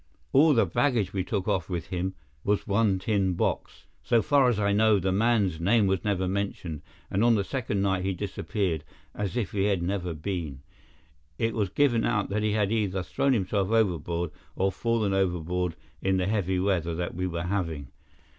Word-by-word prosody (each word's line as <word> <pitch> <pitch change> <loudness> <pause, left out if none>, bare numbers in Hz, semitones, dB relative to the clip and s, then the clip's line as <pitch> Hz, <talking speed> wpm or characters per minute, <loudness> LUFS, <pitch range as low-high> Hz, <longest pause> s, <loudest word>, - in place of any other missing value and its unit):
All 150 +2 +6
the 115 - +4
baggage 105 - +1
we 95 -2 0
took 95 -1 -2
off 95 -2 0
with 85 -3 -4
him 95 +1 -2 0.3
was 105 0 0
one 100 -1 +2
tin 95 -2 0
box. - - -2 0.2
So 115 -3 +2
far 140 0 +4
as 115 -4 0
I 100 -1 +2
know, 110 0 +4
the 95 0 0
man's 100 -4 +2
name 105 +5 +3
was 95 -1 0
never 95 -3 0
mentioned, 95 -5 -3 0.3
and 100 - +1
on 120 -1 +5
the 100 - +1
second 105 -4 -2
night 95 -2 +1
he 95 - 0
disappeared 95 -3 -2 0.3
as 105 +3 -3
if 115 - -1
he 100 -1 0
had 100 -4 +1
never 90 -2 -2
been. 80 -5 -4 0.7
It 115 0 0
was 105 -4 0
given 120 +1 +2
out 100 -1 0
that 105 +2 -1
he 105 -1 +1
had 105 -1 +1
either 100 -4 0
thrown 135 +9 +1
himself 100 -2 0
overboard 85 -6 0 0.2
or 95 +1 +1
fallen 115 -2 0
overboard 90 -2 0 0.3
in 95 0 +1
the 90 - 0
heavy 95 -2 0
weather 90 -4 0
that 85 +1 -3
we 90 +2 -2
were 85 -1 -3
having. 85 -7 -2
95 Hz, 190 wpm, -27 LUFS, 90-105 Hz, 0.7 s, All